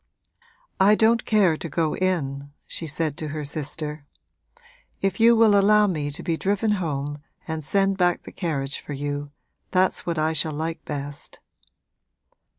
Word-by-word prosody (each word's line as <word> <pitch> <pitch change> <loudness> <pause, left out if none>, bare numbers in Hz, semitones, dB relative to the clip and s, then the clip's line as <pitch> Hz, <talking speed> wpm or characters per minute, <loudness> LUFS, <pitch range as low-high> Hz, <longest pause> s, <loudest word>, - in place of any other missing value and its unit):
'I 200 +2 +6
don't 230 +2 +3
care 200 -7 +4
to 165 - -6
go 160 0 0
in,' 145 -7 -1 0.2
she 165 - -5
said 155 0 -1
to 155 - -4
her 150 0 -4
sister. 150 0 -5 0.9
'If 195 -1 -1
you 230 +1 +7
will 220 -2 +5
allow 210 +1 +5
me 155 -7 -1
to 145 - -7
be 165 -1 -1
driven 205 +4 +1
home 145 -2 -3 0.3
and 160 -1 -3
send 195 +6 +1
back 175 -1 +2
the - - -10
carriage 140 -6 -3
for 145 - -7
you, 145 +1 -3 0.4
that's 185 0 +2
what 170 -2 -2
I 155 +1 +1
shall 155 0 -1
like 160 +2 -4
best.' 145 -1 -7
160 Hz, 155 wpm, -24 LUFS, 145-195 Hz, 0.9 s, you